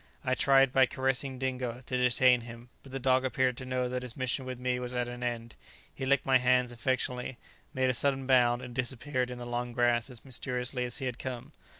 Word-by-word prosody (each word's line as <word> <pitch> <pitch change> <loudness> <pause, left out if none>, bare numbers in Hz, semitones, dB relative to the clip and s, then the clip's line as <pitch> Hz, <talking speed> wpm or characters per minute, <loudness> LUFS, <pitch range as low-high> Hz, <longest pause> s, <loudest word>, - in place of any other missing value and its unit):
I 130 - +2
tried, 135 0 +4
by 130 -1 +5
caressing 130 0 -1
Dingo, 125 -1 -3
to 130 - -3
detain 125 0 +4
him; 120 +1 -11
but 135 - -14
the 135 - -3
dog 130 0 +2
appeared 130 -1 +1
to 130 - -7
know 130 -1 0
that 125 0 -3
his 125 -2 -6
mission 130 0 -1
with 130 -1 -5
me 125 0 -1
was 125 0 -5
at 125 0 0
an 120 0 -7
end; 115 -1 -3 0.4
he 130 - -4
licked 140 0 +3
my 130 -1 +5
hands 125 0 +3
affectionately, 125 +1 -2 0.3
made 130 0 +1
a - - -3
sudden 135 +1 +1
bound, 125 -1 +4
and 125 -1 -8
disappeared 130 +1 -1
in 125 - -6
the 120 - -7
long 120 0 -3
grass 120 +1 +2
as 125 -1 -12
mysteriously 125 0 -1
as 120 - -5
he 135 - -4
had 125 -2 -3
come. 125 -2 -6
125 Hz, 225 wpm, -30 LUFS, 120-130 Hz, 0.4 s, by